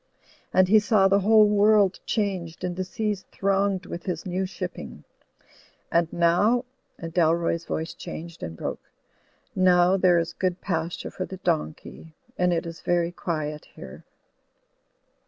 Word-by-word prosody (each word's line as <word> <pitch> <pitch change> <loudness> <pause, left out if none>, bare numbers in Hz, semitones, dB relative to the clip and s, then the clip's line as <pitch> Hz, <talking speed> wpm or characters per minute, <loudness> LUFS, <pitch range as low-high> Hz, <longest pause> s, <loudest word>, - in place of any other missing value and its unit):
And 185 0 +4
he 215 +3 +6
saw 210 -2 +3
the 195 +1 +3
whole 215 +1 +5
world 205 -2 +4
changed 185 -6 -2
and 180 -1 -2
the 185 - -2
seas 205 +1 -3
thronged 195 -1 0
with 170 - -7
his 175 -1 -3
new 185 +1 -2
shipping; - - -7 0.9
and 170 -1 +2
now," 190 +9 +2 0.3
and 165 -1 -7
Dalroy's 170 0 +1
voice 160 +1 -3
changed 170 +1 -9
and 80 0 -6
broke, - - -6 0.7
"now 180 0 +4
there 185 -2 +4
is 170 0 -1
good 180 -1 -1
pasture 165 -2 -3
for 185 - -4
the 190 - -8
donkey 160 -2 -3 0.2
and 180 0 +1
it 170 -1 -1
is 165 -1 -8
very 175 -1 +1
quiet 155 -4 -4
here." 65 - -11
180 Hz, 145 wpm, -25 LUFS, 170-195 Hz, 0.9 s, he